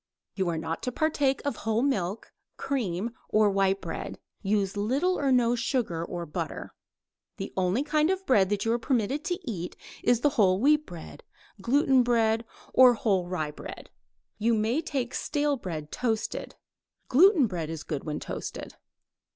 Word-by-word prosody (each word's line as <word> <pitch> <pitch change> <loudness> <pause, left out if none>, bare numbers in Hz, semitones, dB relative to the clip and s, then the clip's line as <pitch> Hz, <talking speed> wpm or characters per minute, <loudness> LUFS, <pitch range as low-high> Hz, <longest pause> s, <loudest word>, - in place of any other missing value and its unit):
_ - - -64 0.3
You 190 -3 -1
are 165 - -1
not 160 +1 -3
to 250 - -2
partake 285 -1 +1
of 285 -5 -1
whole 220 +2 0
milk, 205 -7 -1 0.2
cream, 230 -6 -2 0.2
or 215 -1 +4
white 195 0 +1
bread. - - -5 0.2
Use 200 -1 0
little 270 - +1
or 275 -2 +1
no 240 -2 +4
sugar 230 - -1
or 175 0 -5
butter. 150 - -5 0.6
The - - -6
only 185 +7 +1
kind 305 +1 +2
of 380 0 -1
bread 195 - +4
that 205 0 -1
you 225 - +2
are 240 - 0
permitted 260 +3 0
to 355 -2 -1
eat 180 -6 -4 0.3
is 240 -1 +2
the 290 - +4
whole 185 -1 +4
wheat 300 +5 +3
bread, 170 -3 -10 0.4
gluten 265 +2 +4
bread, 230 -2 +2 0.3
or 255 -2 +7
whole 195 -6 +1
rye 155 -5 -2
bread. - - -10 0.5
You 230 +2 +2
may 225 +8 +1
take 270 -6 -3
stale 295 -1 0
bread 160 - -6
toasted. 225 -3 -2 0.5
Gluten 330 - +6
bread 175 -7 -3
is 160 -2 -5
good 145 -3 -4
when 150 -1 -3
toasted. - - -6
225 Hz, 165 wpm, -27 LUFS, 190-270 Hz, 0.6 s, or